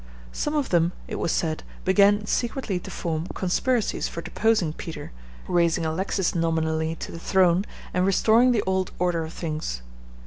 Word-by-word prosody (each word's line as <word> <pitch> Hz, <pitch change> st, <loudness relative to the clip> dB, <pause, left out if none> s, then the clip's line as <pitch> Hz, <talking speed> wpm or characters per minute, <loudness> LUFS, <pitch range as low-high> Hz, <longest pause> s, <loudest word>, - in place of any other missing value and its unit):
Some 295 Hz, -, -2 dB
of 290 Hz, -3 st, 0 dB
them, 170 Hz, 0 st, +2 dB
it -, -, -4 dB
was 170 Hz, -, 0 dB
said, 155 Hz, -2 st, -1 dB, 0.2 s
began 205 Hz, +2 st, +4 dB
secretly 235 Hz, -4 st, -1 dB
to -, -, -9 dB
form 160 Hz, 0 st, -3 dB
conspiracies 220 Hz, +6 st, 0 dB
for 170 Hz, -, -6 dB
deposing 215 Hz, -8 st, +1 dB
Peter, 155 Hz, -3 st, -7 dB, 0.4 s
raising 170 Hz, -2 st, +2 dB
Alexis 185 Hz, +3 st, 0 dB
nominally 160 Hz, -1 st, 0 dB
to -, -, -7 dB
the 165 Hz, -, -7 dB
throne, 185 Hz, +1 st, +3 dB, 0.3 s
and 180 Hz, -, +2 dB
restoring 220 Hz, +6 st, +4 dB
the 225 Hz, -4 st, +1 dB
old 190 Hz, -1 st, 0 dB
order 175 Hz, -2 st, +1 dB
of 160 Hz, -, -6 dB
things. 155 Hz, -, -4 dB
175 Hz, 160 wpm, -25 LUFS, 165-200 Hz, 0.4 s, began